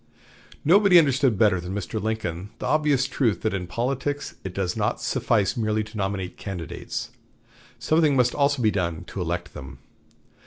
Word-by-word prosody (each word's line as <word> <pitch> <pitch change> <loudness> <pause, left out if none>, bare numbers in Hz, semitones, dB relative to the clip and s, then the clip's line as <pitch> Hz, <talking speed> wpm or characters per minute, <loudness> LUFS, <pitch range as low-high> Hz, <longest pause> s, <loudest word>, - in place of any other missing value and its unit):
Nobody 190 +3 +6
understood 135 - +3
better 95 -4 +3
than 90 +2 -5
Mr. 105 +3 -3
Lincoln 100 -4 -3
the - - -5
obvious 150 -3 +2
truth 130 -5 0
that 110 - 0
in 90 -2 -3
politics 135 +8 -2
it 95 - -5
does 90 -1 -2
not - - -1
suffice 105 -4 +1
merely 110 -2 0
to 110 +1 -12
nominate 95 -2 -3
candidates. 90 -6 -6 0.7
Something 155 -3 +2
must 125 -2 +3
also 140 -3 +1
be 110 - +4
done 85 -4 -2
to 95 - -5
elect 85 0 -3
them. 65 - -9
110 Hz, 160 wpm, -24 LUFS, 95-135 Hz, 0.7 s, Nobody